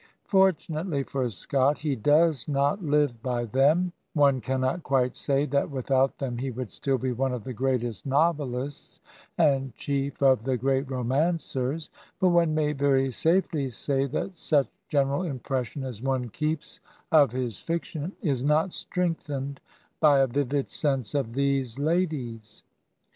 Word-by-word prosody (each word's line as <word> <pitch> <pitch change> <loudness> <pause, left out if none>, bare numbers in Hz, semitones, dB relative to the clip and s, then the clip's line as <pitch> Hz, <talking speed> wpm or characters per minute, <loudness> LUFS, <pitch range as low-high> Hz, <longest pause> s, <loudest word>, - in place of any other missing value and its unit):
Fortunately 175 - +1
for 130 -2 -2
Scott, 135 +8 +1
he 145 -2 -1
does 150 +3 +3
not 145 +6 +1
live 145 -6 +1
by 120 -1 -1
them; 150 - +2 0.2
one 140 -3 +4
cannot 130 +7 -1
quite 130 -4 +1
say 140 0 +1
that 140 -1 0
without 135 -1 +1
them 125 -4 -3
he 135 +2 -2
would 125 -2 -5
still 135 -1 0
be 130 +1 -2
one 130 +2 0
of 125 -4 -4
the 130 - -5
greatest 120 -4 -1
novelists, 140 -2 -1 0.4
and 135 -6 +2
chief 140 0 -2
of 130 -4 +5
the 130 0 0
great 135 +2 0
romancers; 135 +2 -1 0.3
but 185 -1 +4
one 170 -3 +3
may 150 -1 +1
very 135 -1 +2
safely 160 -1 +1
say 135 +3 -1
that 165 +5 -4
such 145 -4 +2 0.2
general 140 +1 +1
impression 135 -4 -3
as 125 -5 -6
one 130 -2 -1
keeps 155 +6 -3 0.3
of 145 -6 +6
his 125 -4 -3
fiction 165 0 -3
is 135 -7 0
not 155 +5 +2
strengthened 145 -6 -3 0.4
by 150 -3 +6
a 135 - +5
vivid 140 +2 -1
sense 135 -7 -1
of 135 -6 -1
these 135 -2 0
ladies. 140 -9 -2
140 Hz, 150 wpm, -27 LUFS, 130-150 Hz, 0.4 s, of